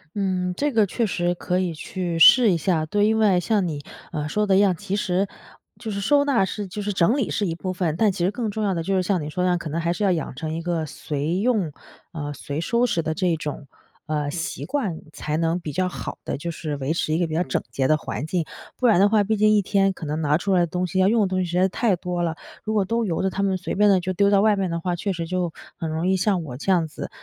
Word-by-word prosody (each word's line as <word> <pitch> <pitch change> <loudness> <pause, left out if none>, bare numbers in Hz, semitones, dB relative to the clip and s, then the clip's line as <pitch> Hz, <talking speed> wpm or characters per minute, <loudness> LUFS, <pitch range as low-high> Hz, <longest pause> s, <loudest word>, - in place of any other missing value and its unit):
嗯， 185 -3 -1
这 290 +1 0
个 225 -4 +4
确 225 +4 -1
实 175 -2 0
可 180 +1 -2
以 180 -3 -1
去 175 +1 -4
试 230 +6 +8
一 175 - +2
下。 160 -1 0
对， 205 +6 +2
因 220 0 +2
为 205 -5 +4
像 200 0 +1
你， 145 -3 -4 0.3
呃， 150 -2 -3
说 210 +6 +1
的 195 -2 +3
一 - - +5
样， 200 -3 +4
其 200 +2 -3
实 195 -1 0 0.5
就 225 - -6
是 200 -1 -3
收 285 +8 +3
纳 260 -9 +2
是 200 +1 -5
就 205 +3 -5
是 205 0 -2
整 190 +10 +3
理 255 - -1
是 205 - 0
一 165 - -2
部 185 +1 -4
分， 175 -4 -1
但 210 0 +3
其 180 -2 -3
实 185 - +3
更 225 0 -3
重 215 +1 -3
要 195 -3 +1
的 165 - -2
就 195 +3 0
是 185 - +3
像 185 0 0
你 - - -5
说 180 - -1
的 - - +2
那 - - +3
样， - - +1
可 170 -2 -6
能 165 +2 -1
还 170 - 0
是 190 +5 -2
要 195 - +3
养 160 -6 -2
成 155 +3 -4
一 165 - -3
个 170 -2 -1
随 150 +3 -3
用， 210 -7 +1 0.4
啊， 145 -3 -5
随 145 +2 -5
收 235 +7 +2
拾 170 -8 0
的 160 0 -2
这 180 -2 +1
种， 150 -2 -6 0.4
呃， 150 -2 -1
习 165 +2 -4
惯， 235 - -2
才 150 - -3
能 165 +1 0
比 160 -3 -6
较 185 +4 0
好 - - -6
地 - - -2
就 170 +4 -4
是 155 -2 -4
维 140 +3 -1
持 155 - -1
一 160 - +2
个 175 - +1
比 160 - -5
较 165 - +1
整 150 -7 -1
洁 130 -1 0
的 155 - +4
环 150 -2 -5
境。 170 0 -1 0.3
不 255 - -1
然 215 -7 +5
的 200 - +6
话 210 0 +3
毕 215 +1 0
竟 215 0 +4
一 205 - +4
天 195 0 +2
可 165 - -8
能 150 +2 -2
拿 150 0 +2
出 195 +2 -1
来 185 - +4
的 175 - +2
东 180 +3 -2
西、 190 +1 -1
要 185 - +5
用 225 +2 +3
的 200 - +3
东 185 0 -1
西 185 - +1
实 175 0 -4
在 180 - +4
是 190 - +3
太 210 +1 +1
多 175 0 -3
了， 165 -2 -1 0.3
如 215 - -1
果 210 - +3
都 230 +4 0
由 170 -4 -1
着 190 - +2
它 195 - -3
们 190 -1 +1
随 185 - -4
便 205 +2 +4
地 190 -2 +5
就 185 +1 -2
丢 200 +2 +3
到 200 -1 +4
外 215 0 +4
面 190 -2 0
的 170 - -2
话， 180 +1 -1
确 195 +3 -2
实 170 -1 -4
就 180 -1 -2 0.2
很 165 - -3
容 160 +2 -2
易 190 0 +3
像 190 -3 +1
我 125 -5 -7
这 150 - -5
样 175 -3 +3
子， - - -7
180 Hz, 320 characters per minute, -23 LUFS, 165-205 Hz, 0.5 s, 试